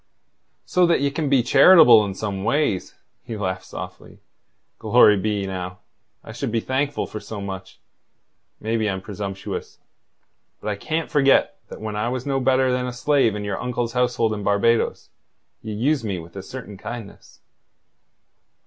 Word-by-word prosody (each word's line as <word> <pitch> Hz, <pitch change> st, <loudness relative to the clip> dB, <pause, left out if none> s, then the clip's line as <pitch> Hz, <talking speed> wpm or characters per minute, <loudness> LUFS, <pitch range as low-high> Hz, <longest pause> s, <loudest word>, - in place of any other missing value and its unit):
"So 180 Hz, -1 st, +3 dB
that 170 Hz, -, +2 dB
ye 140 Hz, 0 st, +1 dB
can 145 Hz, 0 st, -2 dB
be 135 Hz, -3 st, +4 dB
charitable 125 Hz, -5 st, +7 dB
in 100 Hz, -1 st, -5 dB
some 100 Hz, -2 st, -4 dB
ways!" 115 Hz, -5 st, 0 dB, 0.3 s
He 115 Hz, -, -6 dB
laughed 95 Hz, -2 st, -3 dB
softly. -, -, -9 dB, 0.6 s
"Glory 105 Hz, -, +5 dB
be, 105 Hz, 0 st, -1 dB
now, 90 Hz, -1 st, -5 dB, 0.5 s
I -, -, -10 dB
should -, -, -4 dB
be 115 Hz, -, +1 dB
thankful 140 Hz, +4 st, -1 dB
for 110 Hz, -, -7 dB
so 105 Hz, +1 st, -8 dB
much. 95 Hz, -1 st, -7 dB, 0.8 s
Maybe 110 Hz, -1 st, -1 dB
I'm 95 Hz, -1 st, -3 dB
presumptuous. 100 Hz, -1 st, -6 dB, 0.8 s
But 105 Hz, -, -5 dB
I 105 Hz, -, -1 dB
can't 155 Hz, +10 st, -3 dB
forget 140 Hz, -2 st, +3 dB
that -, -, -10 dB
when 110 Hz, -1 st, -4 dB
I 105 Hz, +3 st, -1 dB
was 125 Hz, +1 st, -4 dB
no 135 Hz, -1 st, 0 dB
better 130 Hz, 0 st, +2 dB
than 125 Hz, 0 st, -1 dB
a 125 Hz, -, -4 dB
slave 135 Hz, -4 st, +2 dB
in 105 Hz, -, -4 dB
your 100 Hz, -1 st, -3 dB
uncle's 120 Hz, -1 st, -2 dB
household 125 Hz, -3 st, +1 dB
in 105 Hz, -, -4 dB
Barbados, 105 Hz, +3 st, +1 dB, 0.5 s
ye 110 Hz, -, -6 dB
used 130 Hz, +6 st, 0 dB
me 100 Hz, -4 st, -2 dB
with 85 Hz, +1 st, -11 dB
a 100 Hz, -, -5 dB
certain 105 Hz, -1 st, -9 dB
kindness." 115 Hz, -3 st, -9 dB
110 Hz, 165 wpm, -22 LUFS, 100-130 Hz, 0.8 s, charitable